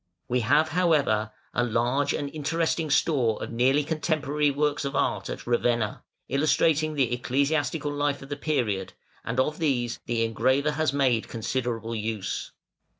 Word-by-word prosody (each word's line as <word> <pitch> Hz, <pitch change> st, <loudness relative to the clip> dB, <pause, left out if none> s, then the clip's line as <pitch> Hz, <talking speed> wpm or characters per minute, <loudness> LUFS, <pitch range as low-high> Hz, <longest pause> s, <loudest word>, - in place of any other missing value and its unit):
We 125 Hz, +1 st, +1 dB
have, 145 Hz, +7 st, +3 dB
however, 145 Hz, -11 st, +2 dB, 0.2 s
a 120 Hz, -, +1 dB
large 120 Hz, +4 st, +1 dB
and 145 Hz, -, -2 dB
interesting 160 Hz, +1 st, -1 dB
store 130 Hz, -7 st, +2 dB
of -, -, -6 dB
nearly 130 Hz, +5 st, +3 dB
contemporary 150 Hz, -1 st, 0 dB
works 145 Hz, +1 st, 0 dB
of 140 Hz, -, -3 dB
art -, -, 0 dB
at -, -, -6 dB
Ravenna, 120 Hz, -2 st, 0 dB, 0.3 s
illustrating 155 Hz, +2 st, +2 dB
the 130 Hz, -4 st, +1 dB
ecclesiastical 145 Hz, +4 st, 0 dB
life 145 Hz, -1 st, -1 dB
of 135 Hz, -, -12 dB
the 145 Hz, -, -2 dB
period, 115 Hz, -11 st, -1 dB, 0.3 s
and 115 Hz, +3 st, -2 dB
of 150 Hz, +4 st, 0 dB
these 125 Hz, -7 st, 0 dB
the 115 Hz, -1 st, +1 dB
engraver 130 Hz, +6 st, +1 dB
has 155 Hz, -1 st, 0 dB
made 130 Hz, -5 st, +1 dB
considerable 115 Hz, -1 st, -3 dB
use. 110 Hz, -2 st, -3 dB
140 Hz, 150 wpm, -26 LUFS, 120-150 Hz, 0.3 s, have